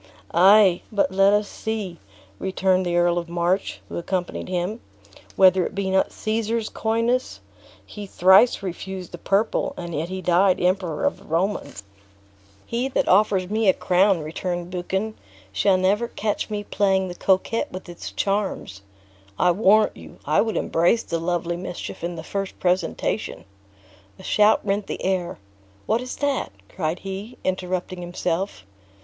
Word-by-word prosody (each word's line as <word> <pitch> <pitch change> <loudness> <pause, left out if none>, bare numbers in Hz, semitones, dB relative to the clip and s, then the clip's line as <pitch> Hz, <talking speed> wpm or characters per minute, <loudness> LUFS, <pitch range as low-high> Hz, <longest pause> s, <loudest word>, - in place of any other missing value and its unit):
"Ay, 190 +1 +6
but 200 -3 +1
let 195 +1 +4
us 205 0 +2
see," 205 -7 -5 0.4
returned 185 -1 +1
the 175 - 0
Earl 175 0 +3
of 170 -1 -7
March, 175 +3 -1
who - - -5
accompanied 180 0 -3
him, 185 +5 -2 0.5
"whether 185 -1 +5
it - - -5
be 195 -1 -1
not 190 0 +2
Caesar's 220 +1 -2
coyness; 230 +3 -1 0.5
he 205 -1 -8
thrice 190 +5 +5
refused 185 0 -6
the 175 - -8
purple, 200 +6 0
and 175 -1 -6
yet 160 +3 -2
he 190 0 -4
died 185 +1 +3
Emperor 180 -3 0
of - - 0
the - - -17
Romans!" 175 - -2 0.8
"He 240 +3 -1
that 270 - 0
offers 195 -1 +3
me 215 -1 +2
a - - +4
crown," 185 -1 +3
returned 175 +3 -4
Buchan, 190 +4 -2 0.4
"shall 185 - +3
never 200 +5 +1
catch 215 -1 -3
me 210 -1 -3
playing 195 -2 +1
the 180 - -6
coquette 190 +5 0
with 185 +1 -8
its 175 -1 -8
charms. 195 - -2 0.6
I 180 - +4
warrant 210 +3 +4
you, - - -13
I - - +3
would 225 -1 -1
embrace 175 +8 +2
the 165 - -3
lovely 170 0 -1
mischief 175 -2 -7
in 175 0 -3
the 160 - -7
first 195 +2 -4
presentation." 180 -1 -1 0.7
A - - -13
shout 210 +1 +3
rent 200 +1 -1
the - - -5
air. 185 -2 -1 0.5
"What 225 +3 +1
is 250 0 -6
that?" 285 -2 -1 0.2
cried 160 +2 -2
he, 195 +5 -7
interrupting 185 -1 -2
himself. 175 - -3
190 Hz, 155 wpm, -23 LUFS, 175-205 Hz, 0.8 s, Ay